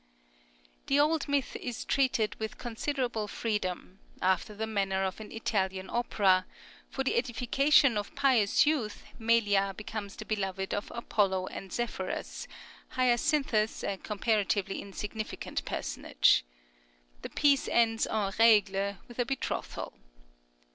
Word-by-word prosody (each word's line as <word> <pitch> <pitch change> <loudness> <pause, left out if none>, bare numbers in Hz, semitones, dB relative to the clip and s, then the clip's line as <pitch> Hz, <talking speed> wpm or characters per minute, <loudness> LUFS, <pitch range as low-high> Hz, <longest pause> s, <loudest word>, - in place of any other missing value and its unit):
_ - - -38
The 275 +1 +3
old 305 +1 +2
myth 285 -2 0
is 245 -2 -5
treated 260 -5 +1
with 220 0 -4
considerable 240 -2 -2
freedom, 200 -4 -3 0.2
after 190 +3 +1
the 220 +2 -2
manner 195 -3 0
of 190 +1 -3
an 215 - -9
Italian 190 -4 -2
opera; 195 -6 +2 0.4
for 270 - -2
the 265 - 0
edification 255 +1 +3
of 205 - -7
pious 260 -4 +4
youth 280 -9 -1 0.2
Melia 205 -4 +2
becomes 210 -1 -6
the 215 - -8
beloved 195 -3 -2
of 205 - -3
Apollo 195 -5 0
and 190 - -8
Zephyrus, 220 -5 -4 0.5
Hyacinthus 245 -2 +2
a 195 - -2
comparatively 205 -2 0
insignificant 210 +2 -5
personage. - - +2 0.8
The - - -6
piece 280 -2 +3
ends 225 -1 +2
en 210 -3 -1
règle 200 -3 +4
with 240 0 -12
a 245 - +2
betrothal. 270 +1 -3
215 Hz, 125 wpm, -30 LUFS, 195-245 Hz, 0.8 s, pious